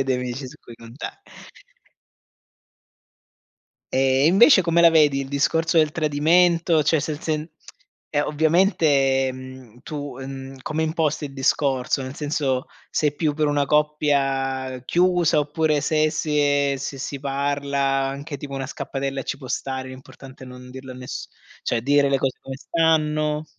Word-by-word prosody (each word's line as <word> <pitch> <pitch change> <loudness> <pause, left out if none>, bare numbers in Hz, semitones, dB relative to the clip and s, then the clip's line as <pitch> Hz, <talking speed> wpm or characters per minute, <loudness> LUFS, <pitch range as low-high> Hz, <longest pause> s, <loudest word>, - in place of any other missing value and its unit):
avere - - +1
dei 135 -1 0
amici 125 +1 -4
su 145 +4 -12
cui 120 - -13
conta 115 - -9 2.7
Ehm, 135 +1 +3
invece 195 - +6
come 170 0 +2
la 170 - +8
vedi 150 -4 +4
il 135 - -5
discorso 160 +4 +1
del 155 -2 +4
tradimento? 165 +2 +3
Cioè, 160 +2 +2
se 155 +2 -3
il 150 - -7
sen 155 -1 -2 0.6
e 145 -1 0
ovviamente, 150 -5 +2
mhmm, 130 -2 -12
tu, 145 -4 -6
ehm, 135 0 -8
come 155 +1 -2
imposti 155 -1 -1
il 135 - -12
discorso? 135 -1 0
Nel 130 +1 -7
senso, 145 -3 -1 0.2
sei 150 -1 0
più 150 0 -1
per 155 -1 +1
una 145 -1 +1
coppia 135 -3 0
chiusa 175 -3 +2
oppure 150 0 0
se 155 -1 +2
si 150 -1 -1
ehm, 145 -1 +2
se 135 +1 -5
si 135 +1 -5
parla 140 0 -2 0.3
anche 140 +2 -6
tipo 140 0 -7
una 135 -1 -3
scappatella 135 0 -4
ci - - -3
può 130 -2 -11
stare, 130 -1 -3
l'importante 130 0 -12
è - - -13
non 125 0 -11
dirlo 130 0 -9
a - - -11
ness 125 0 -7 0.3
cioè, 115 -1 -1
dire 140 +1 +3
le 135 - +2
cose 130 -1 -2
come 135 0 -7
stanno. 155 -1 +1
145 Hz, 160 wpm, -23 LUFS, 135-155 Hz, 2.7 s, la